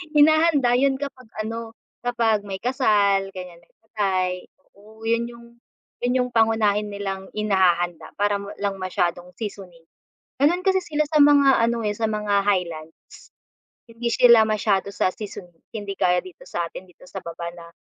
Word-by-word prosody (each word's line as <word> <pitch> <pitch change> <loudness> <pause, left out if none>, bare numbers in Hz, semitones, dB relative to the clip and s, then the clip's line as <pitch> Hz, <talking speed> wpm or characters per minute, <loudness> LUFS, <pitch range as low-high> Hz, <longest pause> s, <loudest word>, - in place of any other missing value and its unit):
Hinahanda 305 -4 +5
'yon 275 0 +3
kapag 265 -3 -7 0.2
ano 225 0 -6 0.3
kapag 230 -4 +1
may 190 -1 -5
kasal 205 -6 +2
ganyan, 180 -2 -9
may - - -29
patay, 195 -4 -1 0.4
oo 215 +2 -17
'yon 230 +1 0 0.8
yung 250 -1 0
pangunahin 220 -2 +2
nilang 195 -2 -5
inihahanda 180 -5 +1
para 205 0 +1
walang 200 -1 -4
masyadong 180 -1 -2
seasoning. 190 -6 -8 0.6
Gano'n 355 +6 +2
kasi 380 -1 +3
sila 305 -2 -1
sa 300 -1 +4
mga 280 -4 +5
ano 230 -1 0
sa 220 0 -1
mga 210 -1 -1
highlands. 170 -5 -4 0.6
Hindi 230 +1 -4
sila 235 -2 +7
masyado 205 -2 0
sa 195 - +1
seasoning, 180 -5 -10
hindi 205 -3 -5
gaya 180 -1 +2
dito 185 -2 -12
sa 170 -1 -3
atin 180 - -10
dito 180 - -18
sa - - -8
baba 170 0 -6
na 170 -1 -12
210 Hz, 145 wpm, -23 LUFS, 185-235 Hz, 0.8 s, sila